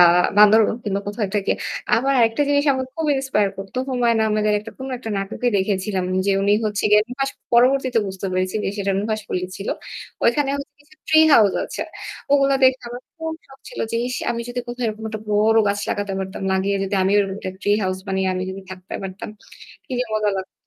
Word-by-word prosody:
আ - - +10 0.3
বান্দরবন 215 +1 +6
কিংবা 200 -1 -1
কোথাও 205 +2 -4
একটা 205 +1 0
গিয়ে - - +1 0.4
আবার 270 +4 +1
আরেকটা 230 +4 +3
জিনিস 285 0 +3
আমার 260 -1 -2
খুব 325 -2 -2
ইন্সপায়ার 235 -7 +1
করতো। 195 +5 -8
হুমায়ুন 240 -3 +2
আহমেদের 215 0 +1 0.3
কোন 265 +1 -6
একটা 225 -3 -6
নাটকে 205 +5 -2
দেখেছিলাম 190 -1 -1 0.2
যে 200 - +3
উনি 200 +1 +3
হচ্ছে 205 -1 -1
গিয়ে 210 0 +6
নুহাস 270 +2 -2 0.2
পরবর্তীতে 255 0 +4
বুঝতে 190 0 -5
পেরেছি 185 +1 -1
যে - - 0
সেটা 195 0 0
নুহাশপল্লি 210 -4 -3
ছিল। 195 - -6 0.6
ওইখানে 270 +4 +3
হচ্ছে 280 - -7
গিয়ে 305 +1 -23
ট্রি 315 0 +6
হাউস 205 -6 +6
আছে। - - -5 0.5
ওগুলো 275 -1 +4
দেখে 260 0 +5
আমার 245 +1 -7 0.2
খুব 320 0 -4
শখ 270 0 -16
ছিল - - -10
যে 230 - -1
ইস 250 - -3 0.2
আমি 235 0 -2
যদি 245 0 -3
কোথাও 240 0 -4
এরকম 220 0 -4
একটা 215 -1 -5
বড় 220 +2 +4
গাছ 205 0 -1
লাগাতে 205 -1 -2
পারতাম। 190 +1 -5
লাগিয়ে 195 +1 +1
যদি 195 +1 -2
আমিও 195 +2 +3
এরকম 195 -1 0
একটা 185 - -5
ট্রি 205 - +2
হাউস 185 0 -1
বানিয়ে 190 0 0
আমি 185 - -2 0.3
থাকতে 185 0 -10
পারতাম। 190 +1 -6 0.6
কি - - -9
যে 250 - +1
মজা 210 -1 +1
লাগতো। 190 - -6
215 Hz, 200 wpm, -21 LUFS, 195-255 Hz, 0.6 s, আ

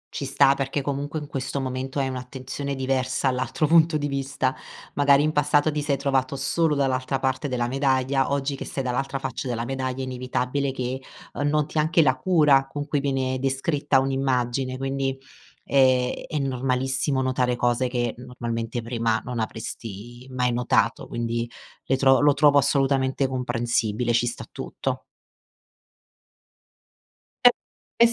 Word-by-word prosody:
Ci 140 - -3
sta, 135 0 +4
perché 135 +1 -2
comunque 140 +2 -3
in 150 - -4
questo 135 -1 -3
momento 130 +1 -4
hai 135 -1 +1
un'attenzione 130 +2 -5
diversa 130 0 0
all'altro 130 +4 -1
punto 160 0 +5
di 145 -1 -2
vista. 135 -1 -1 0.4
Magari, 140 0 +4
in 155 - +2
passato, 145 +1 +2
ti 150 0 -2
sei 145 -1 0
trovato 135 -1 0
solo 150 +3 +1
dall'altra 135 -1 0
parte 130 +2 -1
della 125 -3 -1
medaglia, 135 0 +1
oggi 140 0 -1
che - - -6
sei 135 - -4
dall'altra 135 +2 -2
faccia 135 0 -4
della 120 -1 -2
medaglia, 130 0 -3
è - - -2
inevitabile 130 +2 -2
che 130 0 -4 0.4
noti 150 +1 +1
anche 160 +2 +4
la - - +3
cura 150 -7 +4
con 145 +1 -5
cui 145 0 0
viene 135 -2 -1
descritta 135 +1 +1
un'immagine, 130 -1 0
quindi 135 0 -2 0.5
è 130 -2 +2
è 155 - -3
normalissimo 130 +1 0
notare 125 -1 +1
cose 120 +1 +1
che 120 -2 -1
normalmente 120 -1 -4
prima 115 -1 0
non 125 -1 -4
avresti 115 +2 -6
mai 125 -1 0
notato, 120 0 +1
quindi 115 0 -2 0.4
le 135 - +2
tro 135 0 +5
lo 145 0 +5
trovo 145 0 +5
assolutamente 135 -1 +2
comprensibile, 120 -2 -1
ci 120 +1 +2
sta 120 - -5
tutto. - - -4 2.4
E - - +12 0.5
e - - +9
135 Hz, 145 wpm, -24 LUFS, 125-140 Hz, 2.4 s, E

